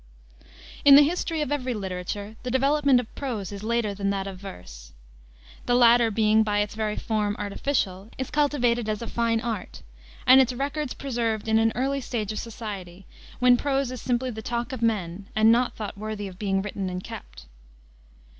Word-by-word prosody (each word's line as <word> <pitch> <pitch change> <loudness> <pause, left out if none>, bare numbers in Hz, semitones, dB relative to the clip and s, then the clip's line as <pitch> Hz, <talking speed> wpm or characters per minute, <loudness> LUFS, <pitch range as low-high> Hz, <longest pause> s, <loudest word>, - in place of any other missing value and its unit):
In 280 -1 +9
the 290 - +9
history 325 0 -1
of 295 - -2
every 255 -4 -1
literature 200 +2 -5
the 250 - -4
development 275 +1 +3
of 245 - -7
prose 230 -9 -4
is 200 -1 -7
later 225 -1 0
than 200 0 -2
that 195 -1 -1
of 195 -2 -7
verse. - - -11 0.7
The 245 - +3
latter 240 -1 +6
being, 215 0 +3
by 205 -1 +1
its 205 0 -3
very 215 -1 -2
form, 210 -2 -1
artificial, 200 -2 -2
is 260 - -4
cultivated 245 -6 +1
as 215 +1 -2
a - - -5
fine 230 -1 0
art, 225 -5 -5 0.4
and 260 +1 +8
its 255 -1 +1
records 280 +2 -3
preserved 230 -5 -2
in 220 0 +4
an 225 0 +3
early 275 +2 0
stage 220 -5 -3
of 215 - -4
society, 195 -5 -7 0.3
when 250 -1 +5
prose 275 -1 0
is 255 - -6
simply 250 0 -1
the 220 -1 -7
talk 240 +4 -3
of 255 - -5
men, 200 -4 -1
and 220 +1 +5
not 240 +2 +2
thought 210 -2 -5
worthy 210 0 -5
of 185 -1 -11
being 195 -2 0
written 200 -2 -4
and 180 0 -5
kept. - - -10
225 Hz, 185 wpm, -25 LUFS, 205-250 Hz, 0.7 s, In